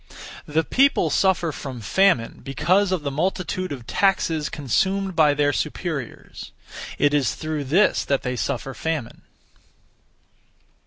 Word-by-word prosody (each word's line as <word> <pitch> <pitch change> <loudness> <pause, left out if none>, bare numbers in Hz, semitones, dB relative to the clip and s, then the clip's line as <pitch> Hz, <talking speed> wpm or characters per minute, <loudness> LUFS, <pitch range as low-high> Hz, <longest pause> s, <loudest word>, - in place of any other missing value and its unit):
The 155 +2 +1
people 275 - +2
suffer 185 -4 +2
from 135 -4 -7
famine 120 - +1
because 180 +9 +1
of 180 -5 -1
the 140 - -2
multitude 185 +3 -2
of 130 -5 -7
taxes 165 -5 +1
consumed 190 - -1
by 150 -3 +4
their 145 0 +2
superiors. 150 - -5 0.5
It 145 0 +2
is 140 -6 +1
through 155 -2 -4
this 175 +10 +3
that 140 -1 0
they 125 0 -2
suffer 135 +2 -3
famine. 155 -7 -4
155 Hz, 125 wpm, -23 LUFS, 140-185 Hz, 0.5 s, by